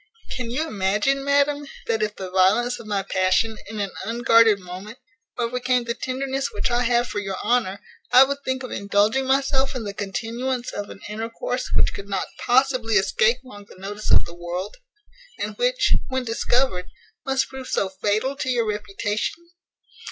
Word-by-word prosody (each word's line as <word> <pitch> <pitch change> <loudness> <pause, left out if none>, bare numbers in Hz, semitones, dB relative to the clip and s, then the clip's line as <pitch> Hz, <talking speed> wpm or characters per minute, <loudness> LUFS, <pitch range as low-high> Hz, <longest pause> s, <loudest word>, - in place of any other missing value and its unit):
Can 250 -3 -4
you 300 +7 -1
imagine, 210 +6 +1
madam, 285 +1 +2 0.2
that 225 -1 0
if 210 0 -1
the 185 -1 -6
violence 215 +7 +3
of 220 - -10
my 200 -2 0
passion, 190 +4 +1
in 215 0 -5
an 200 -2 -2
unguarded 230 0 +5
moment, 190 +5 -9 0.4
overcame 250 +1 +1
the 235 0 -2
tenderness 270 +2 -2
which 205 +4 -1
I 240 0 +2
have 240 0 +2
for 205 - -3
your 195 -2 -4
honour, 215 -4 +1 0.3
I 255 - +9
would 280 +1 -1
think 260 0 -2
of 255 - -6
indulging 205 +6 +1
myself 270 0 +2
in 250 - -3
the 200 -1 -4
continuance 235 +5 -3
of 205 0 -5
an - - -11
intercourse 225 +4 -3
which - - +3
could 200 0 -8
not 195 -2 -1
possibly 250 -3 +2
escape 215 +5 +3
long 205 -6 -12
the - - -16
notice 205 +3 -6
of - - +5
the 170 - -9
world; 175 - -5 0.6
and - - -4
which, - - +3
when 260 -1 -1
discovered, 225 -4 +1 0.4
must 270 0 0
prove 265 -1 -8
so 195 - +1
fatal 210 +8 -1
to 260 - -2
your 240 -2 +2
reputation? 210 - -3
230 Hz, 175 wpm, -23 LUFS, 200-260 Hz, 0.6 s, I